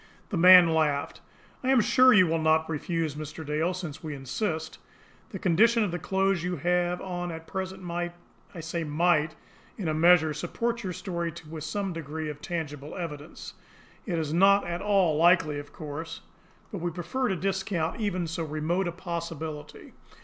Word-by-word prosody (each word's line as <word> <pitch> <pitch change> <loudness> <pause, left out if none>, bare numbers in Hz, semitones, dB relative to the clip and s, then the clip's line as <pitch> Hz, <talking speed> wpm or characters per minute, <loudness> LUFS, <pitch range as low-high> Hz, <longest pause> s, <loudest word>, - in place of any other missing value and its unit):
The 205 - -3
man 180 -1 +8
laughed. 150 -2 0 0.4
"I 255 - 0
am 265 -2 +5
sure 245 +4 +5
you 200 -6 +7
will 165 -1 0
not 160 0 +3
refuse, 160 0 -2
Mr. 155 +1 -7
Dale 155 +4 0
since 170 -5 -6
we 155 -2 -5
insist. 160 - -3 0.5
The - - -6
condition 220 +6 +3
of 200 - -1
the 175 - -3
clothes 190 +1 +1
you 180 +1 -2
have 175 +2 0
on 175 -2 -4
at 160 0 -8
present 190 +1 -5
might 175 0 -3 0.4
I 165 - -6
say 165 +1 -3
'might' 155 0 +1 0.4
in 195 -7 -3
a 155 - +1
measure 160 -1 +5
support 235 +9 -2
your 185 - -3
story 170 -2 -3 0.2
with 155 -1 -7
some 195 +1 -3
degree 160 -1 -5
of 145 0 -12
tangible 150 -4 -5
evidence. 155 -4 -7 0.5
It 175 -4 -1
is 155 -2 -2
not 200 +3 +5
at 175 0 -3
all 195 -7 +2
likely, 165 -3 +4
of 145 0 -10
course; 160 +3 -7 0.5
but 200 - -5
we 175 +1 -1
prefer 175 +10 -2
to 190 - 0
discount 190 0 -2
even 185 -4 -1
so 165 +1 -3
remote 160 +4 -1
a - - -1
possibility. 165 -4 -6
170 Hz, 175 wpm, -27 LUFS, 155-185 Hz, 0.5 s, man